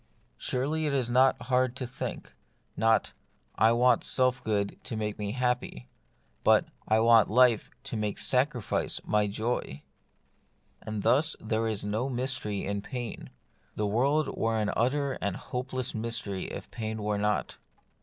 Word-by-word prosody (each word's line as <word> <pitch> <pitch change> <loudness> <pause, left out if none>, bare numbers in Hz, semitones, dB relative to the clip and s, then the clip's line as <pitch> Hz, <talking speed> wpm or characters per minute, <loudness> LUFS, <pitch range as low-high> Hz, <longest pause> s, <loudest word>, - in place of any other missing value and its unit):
Surely 150 +5 -1
it 145 - -1
is 125 -3 0
not 130 +2 +4
hard 130 -1 +1
to 135 - -3
think; 120 - -6 0.2
— - - -42
not, 115 +1 +2 0.4
I 110 +2 +4
want 120 0 +4
self 130 0 +2
good 100 -2 -1
to 115 - -4
make 105 -1 -3
me 105 0 -2
happy; 125 - -2 0.5
but, - - +5 0.2
I 110 0 +4
want 115 -1 +6
life 120 0 +4
to - - -5
make 105 -1 -2
sacrifice 125 -3 +1
my 105 -1 +2
joy! 105 - -3 1.0
And 110 -2 -5
thus 150 +5 +3
there 110 +1 -1
is 110 -3 -2
no 110 +6 -1
mystery 125 -5 -2
in 100 0 -2
pain. 120 0 -6 0.5
The 105 - -1
world 135 +9 +1
were 115 0 0
an 105 -1 0
utter 135 +3 0
and 100 -1 -1
hopeless 130 0 -4
mystery 110 -4 -2
if - - -8
pain 110 -2 -4
were 105 -1 0
not. 105 0 -1
115 Hz, 155 wpm, -29 LUFS, 105-130 Hz, 1.0 s, want